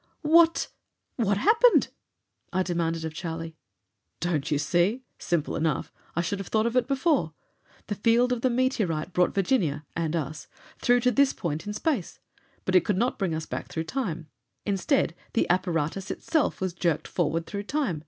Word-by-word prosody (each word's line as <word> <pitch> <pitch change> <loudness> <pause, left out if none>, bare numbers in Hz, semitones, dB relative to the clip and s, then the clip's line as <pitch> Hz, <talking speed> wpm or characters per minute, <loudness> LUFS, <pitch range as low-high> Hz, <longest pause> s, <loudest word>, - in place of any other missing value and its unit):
"What 330 +2 +5 0.5
what 205 -5 +2
happened?" 460 - +5 0.6
I 185 - +1
demanded 165 -2 -1
of 160 - -4
Charlie. 165 -1 -5 0.6
"Don't 160 -4 -1
you 145 - +2
see? 175 - +1 0.2
Simple 170 -3 -1
enough. 160 -1 -1 0.2
I 170 - +2
should 200 +3 -2
have 195 - -6
thought 220 0 +1
of 235 +1 -1
it 250 -2 +3
before. 275 - +1 0.5
The 210 - -3
field 230 +4 +3
of 240 - -3
the 255 - +3
meteorite 220 - 0
brought 180 0 +2
Virginia 175 - +1
and 165 -1 -1
us 155 -1 -4 0.3
through 245 0 +3
to 250 +1 +3
this 280 +1 +3
point 160 -1 -4
in 210 - -3
space. 250 - -1 0.5
But 185 - -1
it 185 -2 +6
could 205 - 0
not 245 +5 0
bring 185 -5 0
us 160 0 -4
back - - -5
through 160 - -3
time; 170 - -3 0.4
instead, 200 - +1 0.2
the - - +2
apparatus 180 0 -1
itself 315 - 0
was 185 -2 -1
jerked 170 -3 0
forward 165 -1 -1
through 205 0 -5
time. 265 - -1
185 Hz, 175 wpm, -27 LUFS, 165-245 Hz, 0.6 s, it